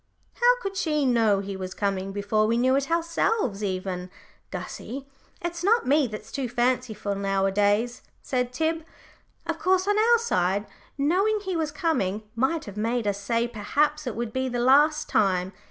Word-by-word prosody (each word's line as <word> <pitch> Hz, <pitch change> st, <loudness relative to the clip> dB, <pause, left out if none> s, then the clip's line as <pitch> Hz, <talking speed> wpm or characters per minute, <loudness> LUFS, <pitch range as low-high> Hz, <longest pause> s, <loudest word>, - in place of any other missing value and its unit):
"How -, -, +4 dB
could 390 Hz, 0 st, -3 dB
she 300 Hz, -5 st, +1 dB
know 225 Hz, -5 st, +3 dB
he 200 Hz, 0 st, -5 dB
was 185 Hz, -1 st, -6 dB
coming 195 Hz, -1 st, -1 dB
before 205 Hz, +2 st, +1 dB
we 230 Hz, +1 st, +2 dB
knew 260 Hz, +2 st, +3 dB
it 275 Hz, +2 st, 0 dB
ourselves, 335 Hz, -, 0 dB
even? 185 Hz, -2 st, -3 dB, 0.4 s
Gussie, 270 Hz, +3 st, -6 dB, 0.4 s
it's 345 Hz, 0 st, -3 dB
not 455 Hz, +5 st, +3 dB
me 285 Hz, +1 st, +3 dB
that's 215 Hz, -1 st, -8 dB
too 270 Hz, -3 st, -3 dB
fanciful 240 Hz, -4 st, 0 dB
nowadays," 200 Hz, +4 st, +1 dB, 0.2 s
said 250 Hz, -2 st, -2 dB
Tib. 320 Hz, +5 st, -1 dB, 0.6 s
"Of 330 Hz, -1 st, -3 dB
course, 375 Hz, +2 st, +2 dB
on 415 Hz, +1 st, +3 dB
our 470 Hz, +2 st, +5 dB
side, 200 Hz, -, 0 dB, 0.3 s
knowing 385 Hz, +9 st, +2 dB
he 380 Hz, -2 st, -3 dB
was 320 Hz, -2 st, 0 dB
coming 260 Hz, -, -1 dB
might 285 Hz, +7 st, 0 dB
have 205 Hz, 0 st, -9 dB
made 230 Hz, +2 st, 0 dB
us 200 Hz, -1 st, -1 dB
say 230 Hz, +3 st, 0 dB
perhaps 290 Hz, +7 st, 0 dB
it 245 Hz, -, -3 dB
would 235 Hz, -1 st, -4 dB
be 260 Hz, 0 st, -1 dB
the 245 Hz, -, -3 dB
last 295 Hz, +5 st, +4 dB
time. 190 Hz, -2 st, +1 dB
245 Hz, 170 wpm, -26 LUFS, 205-320 Hz, 0.6 s, our